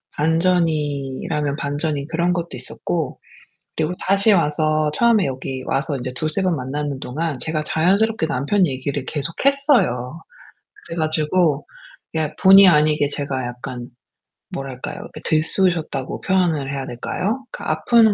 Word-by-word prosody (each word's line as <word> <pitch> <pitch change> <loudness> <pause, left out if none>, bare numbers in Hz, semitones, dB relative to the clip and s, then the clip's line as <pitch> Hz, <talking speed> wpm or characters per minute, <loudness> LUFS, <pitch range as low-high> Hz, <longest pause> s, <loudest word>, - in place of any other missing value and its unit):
반전이라면 150 -3 0
반전인 145 0 -2
그런 170 +2 +1
것도 170 -1 -2
있었고, - - -4 0.6
그리고 155 +3 0
다시 200 +3 +4
와서 155 -2 +2
처음에 225 -5 +3
여기 130 0 -4
와서 135 +2 -1
이제 125 0 -4
2-3 155 +7 -1
번 185 -3 +1
만나는 140 +1 -3
동안 150 +2 -3
제가 155 +1 -2
자연스럽게 195 +4 +2
남편 165 +7 +1
얘기를 135 0 -3
계속 150 +4 -2
했어요. 245 - +2 0.7
그래 165 - -7
가지고 155 0 +1 0.5
이게 155 -1 -2
본의 195 +1 +9
아니게 150 -3 +3
제가 140 -3 -3
약간 120 0 -7 0.7
뭐랄까요. 135 -2 -5
이렇게 - - -10
들쑤셨다고 155 -3 +1
표현을 170 -8 +1
해야 135 -1 -4
될까요? 200 - -3
그 - - -8
아픈 215 +8 +3
155 Hz, 310 characters per minute, -21 LUFS, 140-180 Hz, 0.7 s, 본의